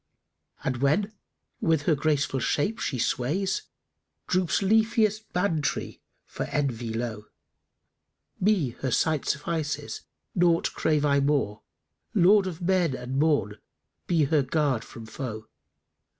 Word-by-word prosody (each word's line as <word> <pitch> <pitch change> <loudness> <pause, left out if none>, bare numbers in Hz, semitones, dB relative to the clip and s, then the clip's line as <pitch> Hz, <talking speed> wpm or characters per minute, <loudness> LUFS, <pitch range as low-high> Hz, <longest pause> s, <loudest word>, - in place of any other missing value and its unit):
And 130 -2 -1
when 175 - +1 0.5
with 160 -3 +2
her 160 - +3
graceful 145 -2 0
shape 150 - 0
she 130 - -2
sways, 160 - -1 0.3
* - - -54
Droops 185 0 +1
leafiest 215 +1 +2
Bán 180 -3 +1
tree[FN#289] 140 - -3 0.3
for - - -5
envy 125 -5 -2
low: 110 -2 -4 1.1
Me 185 - +2
her 130 - -1
sight 155 +3 +1
suffices; 150 -1 -2 0.3
naught 170 -2 +2
crave 150 -2 +1
I 140 -1 +3
more: 140 -7 0 0.3
* 80 - -51
Lord 195 +1 +5
of 180 -1 -6
Men 175 -6 +2
and 125 +2 -3
Morn, 140 -10 +1 0.5
be 165 -3 +3
her 145 +1 +3
guard 135 -3 0
from 115 - -11
foe! 110 -1 -6
150 Hz, 130 wpm, -27 LUFS, 130-180 Hz, 1.1 s, Lord